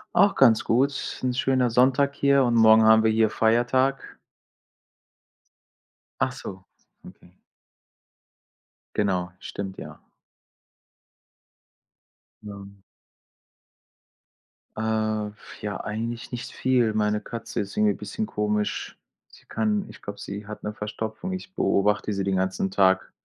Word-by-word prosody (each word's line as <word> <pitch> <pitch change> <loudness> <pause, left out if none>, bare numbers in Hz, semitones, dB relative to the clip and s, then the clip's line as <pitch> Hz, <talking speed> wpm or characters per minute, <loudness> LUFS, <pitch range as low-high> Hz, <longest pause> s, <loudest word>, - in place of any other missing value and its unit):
Auch 200 +2 +5
ganz 115 -5 +5
gut. 130 +5 +2
Ist 140 - -6
'n 125 -1 0
schöner 130 -1 +2
Sonntag 135 +4 +3
hier 140 -1 +3
und 120 -2 +1
morgen 110 -1 +7
haben 110 0 +6
wir 110 - +3
hier 110 0 +3
Feiertag. 120 +5 +1 2.0
Ach 130 - +2
so, 95 -7 -9 0.4
okay. 90 +1 -17 1.6
Genau, 90 -3 0
stimmt, 95 -1 -6
ja. - - -10 2.4
Ja. 100 -2 -9 2.1
Äh, 110 -1 -1
f 105 - -15
ja, 105 -1 -3
eigentlich 115 +2 -5
nichts 125 -1 -6
viel. 125 -4 +1
Meine 105 0 0
Katze 115 - -6
ist 100 - -7
irgendwie 210 -1 +3
bisschen 220 - -5
komisch. 105 - -2 0.3
Sie - - -20
kann 210 -2 -1
ich - - -13
glaube, 100 0 -8
sie 100 +1 -7
hat 105 - -8
'ne 105 - -4
Verstopfung. 110 - -5
Ich 185 0 -7
beobachte 105 +1 +1
sie 100 - -2
den 95 0 0
ganzen 95 0 -1
Tag. 95 -1 +2
110 Hz, 120 wpm, -25 LUFS, 105-130 Hz, 2.4 s, morgen